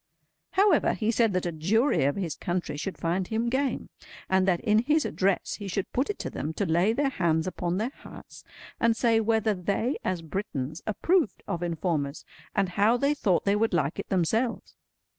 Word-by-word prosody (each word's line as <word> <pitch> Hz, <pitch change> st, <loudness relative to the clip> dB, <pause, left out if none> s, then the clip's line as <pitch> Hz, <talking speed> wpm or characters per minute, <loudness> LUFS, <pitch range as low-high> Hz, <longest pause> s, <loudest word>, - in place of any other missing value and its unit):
However, 390 Hz, -5 st, +4 dB
he 220 Hz, 0 st, 0 dB
said 230 Hz, -1 st, +2 dB
that 185 Hz, 0 st, 0 dB
a 175 Hz, -, -1 dB
jury 180 Hz, -, +2 dB
of 140 Hz, -, +1 dB
his 180 Hz, -6 st, -2 dB
country 175 Hz, -3 st, -3 dB
should 185 Hz, +6 st, -4 dB
find 180 Hz, +2 st, -1 dB
him 230 Hz, +1 st, -1 dB
game; 265 Hz, +2 st, -1 dB, 0.4 s
and 190 Hz, 0 st, +2 dB
that 175 Hz, -3 st, +3 dB
in 215 Hz, -2 st, +3 dB
his 295 Hz, +6 st, +2 dB
address 195 Hz, 0 st, 0 dB
he 205 Hz, -, -6 dB
should 195 Hz, +1 st, -3 dB
put 260 Hz, +3 st, 0 dB
it 415 Hz, -, -2 dB
to -, -, -4 dB
them 155 Hz, +4 st, -4 dB
to -, -, 0 dB
lay 175 Hz, +6 st, +3 dB
their 275 Hz, +4 st, 0 dB
hands 165 Hz, -6 st, +1 dB
upon 180 Hz, -1 st, -2 dB
their 225 Hz, +6 st, -1 dB
hearts -, -, -12 dB, 0.4 s
and 230 Hz, -1 st, +3 dB
say 230 Hz, -2 st, +3 dB
whether 220 Hz, -1 st, +2 dB
they 200 Hz, -, -1 dB
as 180 Hz, -3 st, -2 dB
Britons 155 Hz, -3 st, -4 dB
approved 330 Hz, -, +1 dB
of 170 Hz, -, -3 dB
informers, 160 Hz, -4 st, -2 dB, 0.3 s
and 195 Hz, -2 st, +2 dB
how 205 Hz, +6 st, +3 dB
they 280 Hz, +4 st, +2 dB
thought 195 Hz, -11 st, +1 dB
they 200 Hz, 0 st, +3 dB
would 220 Hz, -3 st, +1 dB
like 150 Hz, -3 st, 0 dB
it -, -, -5 dB
themselves. 220 Hz, +7 st, 0 dB
195 Hz, 195 wpm, -27 LUFS, 175-230 Hz, 0.4 s, However